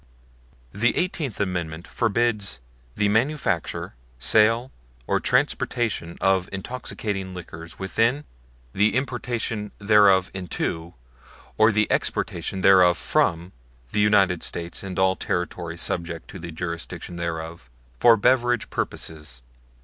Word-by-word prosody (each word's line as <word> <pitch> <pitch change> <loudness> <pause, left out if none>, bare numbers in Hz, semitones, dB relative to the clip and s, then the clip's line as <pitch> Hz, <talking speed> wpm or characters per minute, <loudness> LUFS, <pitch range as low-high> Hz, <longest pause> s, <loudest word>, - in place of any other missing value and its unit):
THE 120 +4 +1
Eighteenth 160 - -2
Amendment 85 -4 -3
forbids 110 - 0 0.4
"the 105 - +2
manufacture, 110 - 0 0.2
sale 115 - +3 0.3
or - - +1
transportation 105 -8 0
of 95 -1 +2
intoxicating 100 -3 -4
liquors 85 -1 -9
within, 115 +8 +1 0.5
the 105 +1 +2
importation 120 -5 -2
thereof 100 -3 +4
into, 85 -2 -4 0.6
or 110 +1 +5
the 105 0 +3
exportation 90 +3 -1
thereof 90 -2 +6
from 85 +2 +1 0.4
the - - 0
United 100 -4 +4
States 85 0 -4
and 95 -2 -6
all 95 0 +3
territory 85 -2 -3
subject 85 0 -2
to 95 - -9
the 85 0 -7
jurisdiction 85 +1 -5
thereof 80 -5 -5 0.3
for 115 -1 +7
beverage 120 +1 +2
purposes." 75 -6 -4
95 Hz, 110 wpm, -24 LUFS, 85-110 Hz, 0.6 s, for